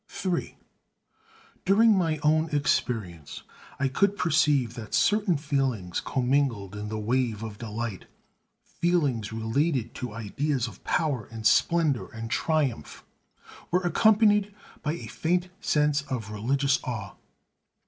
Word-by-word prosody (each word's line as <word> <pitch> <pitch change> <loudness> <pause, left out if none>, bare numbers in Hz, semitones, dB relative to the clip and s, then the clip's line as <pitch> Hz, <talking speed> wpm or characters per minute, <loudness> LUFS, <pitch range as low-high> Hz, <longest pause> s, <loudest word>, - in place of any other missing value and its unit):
III 180 -2 -1 1.1
During 215 +3 +5
my 165 -4 +1
own 155 +2 +3
experience 110 - -1 0.4
I 140 - +2
could 200 +9 +1
perceive 145 -7 +2
that 115 -3 -5
certain 205 -5 +3
feelings 135 - -1
commingled 125 -6 0
in 105 0 -5
the 110 - -3
wave 115 0 -1
of 105 -2 -7
delight, 115 -2 -5 0.6
feelings 145 -12 0
related 120 +3 -1
to 125 -4 -6
ideas 125 +4 -1
of 100 -4 -12
power 140 -9 0
and 110 -1 -8
splendor 160 -1 +3
and 115 0 -7
triumph, 145 - -1 0.6
were 180 +1 +2
accompanied 210 +3 +4 0.3
by 150 - -1
a 170 - -7
faint 175 +2 -1
sense 150 -6 +2
of 115 -5 -4
religious 135 +6 +1
awe. 110 -7 -5
135 Hz, 120 wpm, -27 LUFS, 110-160 Hz, 1.1 s, During